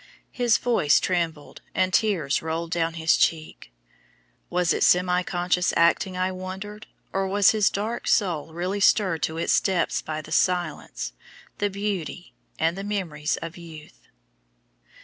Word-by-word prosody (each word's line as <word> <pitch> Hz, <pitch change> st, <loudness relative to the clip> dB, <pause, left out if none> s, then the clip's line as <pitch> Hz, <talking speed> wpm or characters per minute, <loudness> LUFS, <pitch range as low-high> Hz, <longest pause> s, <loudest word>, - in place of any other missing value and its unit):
His 240 Hz, -3 st, +2 dB
voice 190 Hz, -12 st, +3 dB
trembled, 165 Hz, -5 st, -2 dB
and 185 Hz, 0 st, +1 dB
tears 175 Hz, -11 st, +1 dB
rolled 165 Hz, +1 st, -3 dB
down 165 Hz, -1 st, 0 dB
his 160 Hz, 0 st, +3 dB
cheek. 155 Hz, -1 st, -1 dB, 0.8 s
Was 175 Hz, -2 st, +1 dB
it -, -, -2 dB
semi 180 Hz, 0 st, +4 dB
conscious 180 Hz, 0 st, 0 dB
acting, 175 Hz, +2 st, +2 dB
I 185 Hz, +1 st, 0 dB
wondered, 190 Hz, +3 st, -7 dB, 0.3 s
or 195 Hz, 0 st, 0 dB
was 200 Hz, +1 st, +4 dB
his 215 Hz, -2 st, +3 dB
dark 220 Hz, +4 st, -3 dB
soul 170 Hz, -6 st, +1 dB
really 180 Hz, +5 st, -3 dB
stirred 185 Hz, -5 st, +3 dB
to 160 Hz, +3 st, -2 dB
its 165 Hz, -, +3 dB
depths 185 Hz, -4 st, 0 dB
by 155 Hz, 0 st, -5 dB
the -, -, -12 dB
silence, 175 Hz, -, -1 dB, 0.5 s
the 205 Hz, -, +1 dB
beauty, 195 Hz, -3 st, -4 dB, 0.2 s
and 165 Hz, +2 st, +1 dB
the 195 Hz, -, -5 dB
memories 175 Hz, -7 st, -2 dB
of 165 Hz, +1 st, -7 dB
youth? 160 Hz, -3 st, -13 dB
180 Hz, 145 wpm, -25 LUFS, 165-195 Hz, 0.8 s, semi